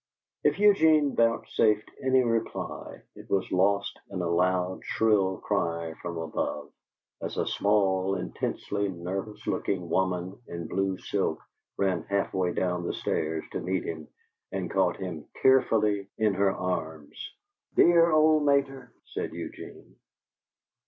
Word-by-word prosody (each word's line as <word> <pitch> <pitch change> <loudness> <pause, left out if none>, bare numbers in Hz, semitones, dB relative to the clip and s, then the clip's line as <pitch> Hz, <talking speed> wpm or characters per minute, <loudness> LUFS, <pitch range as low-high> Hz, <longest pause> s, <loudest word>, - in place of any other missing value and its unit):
If - - +3
Eugene 160 -8 +5
vouchsafed 115 -2 +2
any 130 -1 +3
reply, 115 -1 -3
it - - -13
was 95 -1 0
lost 100 +2 +1
in 95 - -5
a - - 0
loud, 90 +2 +1
shrill 100 -4 +2
cry 85 -1 -1
from 85 -1 -5
above, 80 -1 -3 0.5
as - - -5
a - - +1
small, 95 -2 +1
intensely 100 +2 -3
nervous 95 +4 -5
looking 90 -4 -2
woman 95 0 -1
in 85 -1 -6
blue 95 -1 -1
silk 95 -5 -1 0.4
ran 95 -3 +1
half 100 0 -1
way 90 -2 +1
down 90 0 -1
the - - -1
stairs 80 0 -2
to - - -3
meet 95 0 -1
him 80 -2 -6 0.4
and 95 -3 -3
caught 95 -2 +2
him 90 -5 -6
tearfully 105 -6 +3
in 110 -2 +2
her 100 +1 +3
arms. 80 -5 -5 0.4
"Dear 170 0 +6
old 155 0 +5
mater!" 135 -3 +1
said - - -5
Eugene. - - -9
95 Hz, 130 wpm, -28 LUFS, 90-110 Hz, 0.5 s, Dear